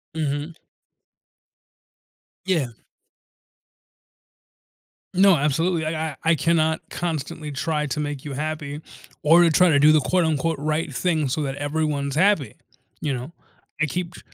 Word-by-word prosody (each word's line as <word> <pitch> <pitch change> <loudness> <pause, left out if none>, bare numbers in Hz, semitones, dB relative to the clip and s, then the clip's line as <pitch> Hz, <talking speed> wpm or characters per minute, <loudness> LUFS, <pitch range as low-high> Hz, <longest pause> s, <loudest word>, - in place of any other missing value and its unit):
Mhm. 150 +1 -2 1.9
Yeah. 170 -8 +1 2.5
No, 190 0 +6
absolutely. 160 +3 0
I 160 0 -2
I 145 - -9
I 165 0 +4
cannot 160 0 +1
constantly 160 -2 -4
try 150 +1 -1
to 150 - -3
make 145 -2 -4
you 145 - -5
happy, 150 0 -4 0.4
or 165 +3 +6
to 170 - +5
try 180 +3 +5
to 145 -3 +4
do 150 +2 +7
the 155 - +5
quote 180 +1 +1
unquote, 160 0 0
"right 155 0 -2
thing" 155 +1 0
so 155 - -1
that 135 -1 -3
everyone's 145 -1 -2
happy, 190 -3 +2 0.5
you 145 -3 -1
know? 130 +4 -5 0.5
I - - +4
keep 175 +4 -4
tr - - -11
155 Hz, 140 wpm, -23 LUFS, 145-165 Hz, 2.5 s, do